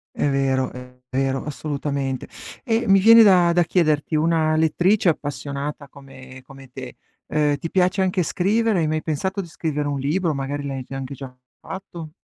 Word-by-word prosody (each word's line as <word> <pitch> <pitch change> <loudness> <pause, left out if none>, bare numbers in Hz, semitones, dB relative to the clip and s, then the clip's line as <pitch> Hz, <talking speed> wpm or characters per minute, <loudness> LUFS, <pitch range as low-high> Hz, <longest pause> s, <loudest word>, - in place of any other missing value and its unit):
È - - 0
vero, 135 -2 0
è 125 0 -12
vero, 135 +1 -1
assolutamente. 140 -3 -4 0.4
Ehm, 230 -3 0
mi 195 - +7
viene 225 +3 +8
da 180 -4 +5
da 175 0 +3
chiederti: 155 -3 +1
una 155 0 +2
lettrice 175 +5 +2
appassionata 145 -1 -3
come 130 -2 -13
come 135 -1 -14
te, - - -9 0.3
ehm, 150 -1 +1
ti 165 - -5
piace 185 +1 +2
anche 185 -1 0
scrivere, 210 +3 +1
hai 155 - 0
mai 155 0 -1
pensato 190 +6 -2
di 190 - -6
scrivere 155 -3 -3
un 140 -2 -2
libro, 160 +3 0
magari 140 +1 -4
l'hai 135 -1 -4
già 135 +2 -8
anche 135 0 -6
già 135 -1 -9 0.3
fatto? 170 -4 -8
150 Hz, 170 wpm, -22 LUFS, 135-180 Hz, 0.4 s, viene